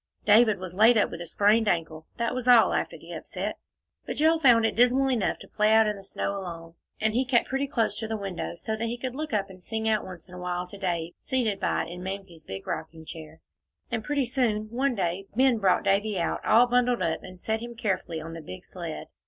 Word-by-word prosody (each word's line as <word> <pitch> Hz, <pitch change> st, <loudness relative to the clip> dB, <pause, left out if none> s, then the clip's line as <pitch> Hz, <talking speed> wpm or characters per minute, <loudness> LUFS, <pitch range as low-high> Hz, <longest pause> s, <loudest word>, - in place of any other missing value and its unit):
David 215 Hz, 0 st, +6 dB
was 185 Hz, -1 st, -7 dB
laid 220 Hz, +5 st, +6 dB
up 210 Hz, -, +2 dB
with 170 Hz, -, -6 dB
a 170 Hz, -, -6 dB
sprained 210 Hz, +5 st, +3 dB
ankle, 160 Hz, -3 st, -1 dB
that 235 Hz, +1 st, -1 dB
was 255 Hz, -1 st, -4 dB
all, 240 Hz, -3 st, +7 dB
after -, -, -2 dB
the -, -, -13 dB
upset. -, -, -5 dB, 0.4 s
But -, -, -5 dB
Joel 320 Hz, +2 st, +3 dB
found 240 Hz, -6 st, +5 dB
it -, -, 0 dB
dismal 255 Hz, +3 st, +4 dB
enough 230 Hz, -6 st, 0 dB
to -, -, -12 dB
play 210 Hz, 0 st, +2 dB
out 220 Hz, 0 st, +6 dB
in 210 Hz, 0 st, 0 dB
the 195 Hz, -, -11 dB
snow 200 Hz, +1 st, -3 dB
alone, 165 Hz, -3 st, -8 dB, 0.3 s
and 220 Hz, 0 st, +1 dB
he 250 Hz, +3 st, +2 dB
kept 250 Hz, -2 st, +2 dB
pretty 270 Hz, +1 st, -1 dB
close 230 Hz, -7 st, 0 dB
to 220 Hz, -, -4 dB
the 220 Hz, 0 st, -2 dB
window, 195 Hz, -4 st, -4 dB
so 220 Hz, +5 st, -3 dB
that 225 Hz, +1 st, -2 dB
he 235 Hz, +1 st, -3 dB
could 250 Hz, 0 st, -4 dB
look 305 Hz, +3 st, -4 dB
up 200 Hz, -3 st, -1 dB
and 185 Hz, -1 st, -14 dB
sing 220 Hz, +3 st, -3 dB
out 215 Hz, -1 st, +2 dB
once 180 Hz, -3 st, -10 dB
in 180 Hz, -, -15 dB
a 180 Hz, -, -8 dB
while 180 Hz, 0 st, -3 dB
to 200 Hz, -, -10 dB
Dave 175 Hz, -3 st, -2 dB
seated 235 Hz, -7 st, 0 dB
by -, -, 0 dB
it -, -, -10 dB
in 175 Hz, +1 st, -7 dB
Mamsie's 190 Hz, -3 st, -7 dB
big 95 Hz, -6 st, -7 dB
rocking 160 Hz, 0 st, -5 dB
chair. 160 Hz, 0 st, -10 dB, 0.5 s
And 225 Hz, -2 st, -2 dB
pretty 285 Hz, +1 st, 0 dB
soon, 230 Hz, -4 st, -1 dB
one 260 Hz, +2 st, 0 dB
day, 190 Hz, 0 st, -2 dB
Ben 255 Hz, -2 st, +4 dB
brought 190 Hz, -3 st, +3 dB
Davie 205 Hz, +1 st, +1 dB
out, 170 Hz, -, -1 dB
all 230 Hz, +3 st, +6 dB
bundled 245 Hz, 0 st, +2 dB
up, 160 Hz, -1 st, -1 dB
and 185 Hz, 0 st, -11 dB
set 220 Hz, +4 st, -1 dB
him 235 Hz, 0 st, -7 dB
carefully 190 Hz, -7 st, -2 dB
on 165 Hz, +1 st, -7 dB
the 165 Hz, -, -7 dB
big 95 Hz, -11 st, -10 dB
sled. -, -, -6 dB
215 Hz, 245 wpm, -27 LUFS, 180-240 Hz, 0.5 s, all